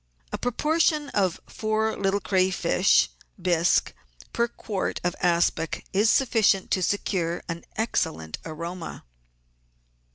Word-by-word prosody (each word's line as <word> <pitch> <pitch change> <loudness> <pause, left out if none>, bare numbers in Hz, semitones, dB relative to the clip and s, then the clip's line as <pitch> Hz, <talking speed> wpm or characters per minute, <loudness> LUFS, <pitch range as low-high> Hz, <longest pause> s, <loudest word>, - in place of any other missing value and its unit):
A - - -2
proportion 300 +3 +1
of 190 -4 0
four 220 0 -1
little 195 0 0
crayfish 185 -1 +3
k - - -26 0.3
bisque 175 -1 +2 0.4
per 235 - +2
quart 215 -4 -3
of 175 0 0
aspic 170 -2 +1
is 210 +3 +4
sufficient 225 -8 +3
to 185 - +2
secure 175 -3 -1
an 165 0 -5
excellent 160 - -2
aroma. 170 +2 -6
190 Hz, 110 wpm, -26 LUFS, 170-220 Hz, 0.4 s, is